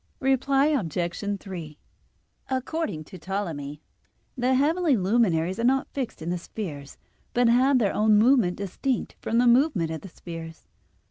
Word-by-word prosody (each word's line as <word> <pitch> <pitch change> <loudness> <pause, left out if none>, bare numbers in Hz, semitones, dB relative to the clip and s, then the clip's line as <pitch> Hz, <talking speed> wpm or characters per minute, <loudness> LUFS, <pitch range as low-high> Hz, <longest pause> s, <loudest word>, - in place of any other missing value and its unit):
Reply 270 +1 +2
Obj. 180 - -1 0.2
3: 170 -7 -8 0.7
According 260 - -2
to 185 +3 -12
Ptolemy 160 -6 -4 0.5
the 255 0 +1
heavenly 305 +1 +2
luminaries 190 -3 +1
are - - -1
not 265 +2 +1
fixed 255 - -4
in 170 - -2
the 180 - -2
spheres, 150 -8 -7 0.4
but 245 0 +4
have 255 +3 +4
their 210 -5 +1
own 215 0 +4
movement 220 -5 +4
distinct 215 +6 -2
from 230 - -1
the 245 - +4
movement 240 - +3
of 160 - -5
the 195 - -10
spheres. 165 -1 -9
215 Hz, 145 wpm, -26 LUFS, 170-260 Hz, 0.7 s, but